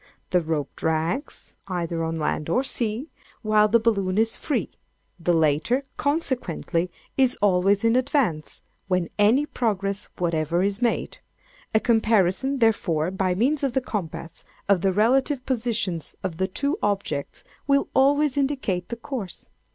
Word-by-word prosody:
The 180 Hz, -, +3 dB
rope 155 Hz, -3 st, -3 dB
drags, 160 Hz, -, -2 dB
either 170 Hz, -3 st, -2 dB
on 165 Hz, 0 st, -2 dB
land 150 Hz, 0 st, -2 dB
or 250 Hz, +10 st, +2 dB
sea, 245 Hz, +3 st, -2 dB, 0.3 s
while 215 Hz, -1 st, +4 dB
the 225 Hz, +3 st, +5 dB
balloon 200 Hz, -4 st, +1 dB
is 225 Hz, +1 st, +2 dB
free; 295 Hz, -, -2 dB, 0.5 s
the 175 Hz, +1 st, +1 dB
latter, 165 Hz, -, +2 dB
consequently, 255 Hz, -, -1 dB, 0.3 s
is 260 Hz, -2 st, +3 dB
always 195 Hz, +1 st, +3 dB
in 230 Hz, +1 st, +3 dB
advance, 255 Hz, -, 0 dB, 0.2 s
when 180 Hz, -3 st, 0 dB
any 230 Hz, +8 st, +4 dB
progress 200 Hz, -7 st, -1 dB
whatever 170 Hz, 0 st, 0 dB
is 200 Hz, +2 st, -1 dB
made: 240 Hz, -1 st, -1 dB, 0.6 s
a -, -, +6 dB
comparison, 225 Hz, +2 st, +2 dB
therefore, 180 Hz, -8 st, +1 dB
by 190 Hz, -1 st, 0 dB
means 270 Hz, +9 st, +1 dB
of 275 Hz, -3 st, 0 dB
the 265 Hz, -, +3 dB
compass, 170 Hz, -9 st, -5 dB, 0.2 s
of 195 Hz, -3 st, +3 dB
the 195 Hz, -, +2 dB
relative 255 Hz, +6 st, +2 dB
positions 225 Hz, -, -1 dB
of 180 Hz, -4 st, -3 dB
the 190 Hz, +1 st, 0 dB
two 285 Hz, -, -2 dB
objects, 200 Hz, -8 st, -2 dB, 0.2 s
will 280 Hz, 0 st, +3 dB
always 285 Hz, +1 st, +3 dB
indicate 260 Hz, -11 st, -1 dB
the 235 Hz, -, -3 dB
course. 230 Hz, -5 st, -6 dB
205 Hz, 145 wpm, -24 LUFS, 175-255 Hz, 0.6 s, a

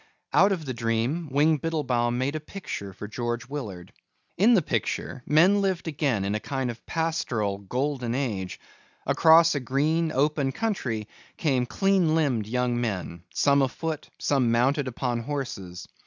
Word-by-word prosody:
Out 200 Hz, -, +5 dB
of 170 Hz, -5 st, -2 dB
the 130 Hz, -, -3 dB
dream 115 Hz, +8 st, -1 dB
Wing 150 Hz, +3 st, +3 dB
Biddlebaum 125 Hz, -7 st, 0 dB
made 135 Hz, +4 st, -1 dB
a -, -, -1 dB
picture 155 Hz, -, -7 dB
for 100 Hz, +2 st, -8 dB
George 120 Hz, +3 st, -3 dB
Willard. 105 Hz, -11 st, -7 dB, 0.4 s
In 225 Hz, +6 st, +5 dB
the 185 Hz, -, +3 dB
picture 135 Hz, -, -2 dB
men 180 Hz, +7 st, +5 dB
lived 190 Hz, -4 st, -1 dB
again 135 Hz, -10 st, 0 dB
in 100 Hz, -, -1 dB
a 105 Hz, -, 0 dB
kind 130 Hz, 0 st, -2 dB
of 115 Hz, -, -13 dB
pastoral 120 Hz, -12 st, -1 dB
golden 125 Hz, +3 st, -2 dB
age. 105 Hz, -9 st, -3 dB, 0.5 s
Across 165 Hz, +1 st, +6 dB
a 145 Hz, -, 0 dB
green 155 Hz, +6 st, +1 dB
open 145 Hz, -1 st, +1 dB
country 130 Hz, -, -2 dB, 0.3 s
came 130 Hz, -5 st, +1 dB
clean 180 Hz, -, +2 dB
limbed 130 Hz, -10 st, +1 dB
young 120 Hz, +1 st, 0 dB
men, 90 Hz, -7 st, -3 dB
some 140 Hz, 0 st, +3 dB
afoot, 155 Hz, +3 st, -2 dB
some 135 Hz, -4 st, +1 dB
mounted 130 Hz, +4 st, +2 dB
upon 125 Hz, -1 st, -2 dB
horses. 115 Hz, -9 st, -5 dB
135 Hz, 155 wpm, -26 LUFS, 115-155 Hz, 0.5 s, Across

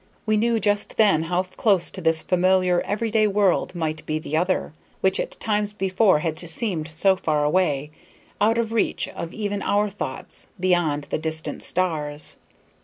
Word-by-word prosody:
We 215 Hz, -1 st, +2 dB
knew 230 Hz, +1 st, +2 dB
just 205 Hz, 0 st, 0 dB
then 205 Hz, -8 st, +4 dB
how 175 Hz, +3 st, 0 dB
close 190 Hz, 0 st, +1 dB
to 190 Hz, -, -8 dB
this 160 Hz, -1 st, +2 dB
familiar, 185 Hz, 0 st, +2 dB
every 215 Hz, +2 st, -2 dB
day 215 Hz, -1 st, +3 dB
world 200 Hz, -3 st, +1 dB
might 155 Hz, -2 st, -3 dB
be 155 Hz, -, 0 dB
the 155 Hz, 0 st, -4 dB
other, 180 Hz, -1 st, 0 dB, 0.3 s
which 190 Hz, 0 st, +2 dB
at -, -, -4 dB
times 210 Hz, -1 st, -1 dB
before 190 Hz, -3 st, +2 dB
had 160 Hz, -1 st, -2 dB
seemed 170 Hz, -2 st, -3 dB
so 190 Hz, +5 st, +2 dB
far 155 Hz, -5 st, 0 dB
away, 150 Hz, -3 st, +1 dB, 0.5 s
out 225 Hz, +2 st, +3 dB
of 225 Hz, -1 st, -1 dB
reach 225 Hz, -, 0 dB
of 165 Hz, -, -6 dB
even 205 Hz, -1 st, -3 dB
our 205 Hz, 0 st, +1 dB
thoughts, -, -, -6 dB
beyond 175 Hz, -5 st, +1 dB
the -, -, 0 dB
distant 160 Hz, 0 st, -3 dB
stars. 155 Hz, -5 st, -1 dB
185 Hz, 170 wpm, -23 LUFS, 160-205 Hz, 0.5 s, then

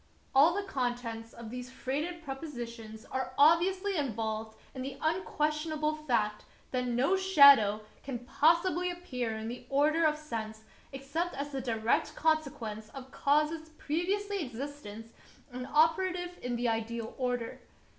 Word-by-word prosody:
All 305 Hz, +6 st, +6 dB
the 405 Hz, -, -1 dB
contents 240 Hz, -5 st, -3 dB
of 230 Hz, -2 st, -9 dB
these 250 Hz, 0 st, -6 dB
freighted 300 Hz, +7 st, -3 dB
propositions 240 Hz, -7 st, -7 dB
are 260 Hz, 0 st, -3 dB
obviously 370 Hz, +6 st, +4 dB
involved 220 Hz, -5 st, -2 dB, 0.2 s
in 260 Hz, -, -6 dB
the 270 Hz, +1 st, -5 dB
unquestionable 310 Hz, -2 st, 0 dB
fact 235 Hz, -9 st, 0 dB, 0.3 s
that 250 Hz, -1 st, -1 dB
no 250 Hz, +10 st, +2 dB
shadow 280 Hz, -, +7 dB, 0.2 s
can 265 Hz, -2 st, -4 dB
possibly 335 Hz, +8 st, +2 dB
appear 250 Hz, -11 st, -3 dB
in 220 Hz, 0 st, -5 dB
the 240 Hz, +2 st, -6 dB
order 300 Hz, +4 st, +3 dB
of 305 Hz, -1 st, +3 dB
sense 220 Hz, -7 st, -6 dB, 0.3 s
except 280 Hz, +6 st, -3 dB
as 280 Hz, +1 st, -3 dB
the 270 Hz, -1 st, -3 dB
direct 235 Hz, +5 st, 0 dB
consequence 255 Hz, -9 st, -1 dB
of 265 Hz, -1 st, -9 dB
causes 305 Hz, +3 st, +1 dB
previously 390 Hz, +5 st, -1 dB
existent 240 Hz, -4 st, -7 dB, 0.4 s
and 250 Hz, +1 st, -6 dB
operative 355 Hz, +3 st, +2 dB
in 245 Hz, -1 st, -2 dB
the 240 Hz, +1 st, 0 dB
ideal 225 Hz, 0 st, -2 dB
order. 245 Hz, -2 st, -2 dB
275 Hz, 135 wpm, -31 LUFS, 235-315 Hz, 0.4 s, shadow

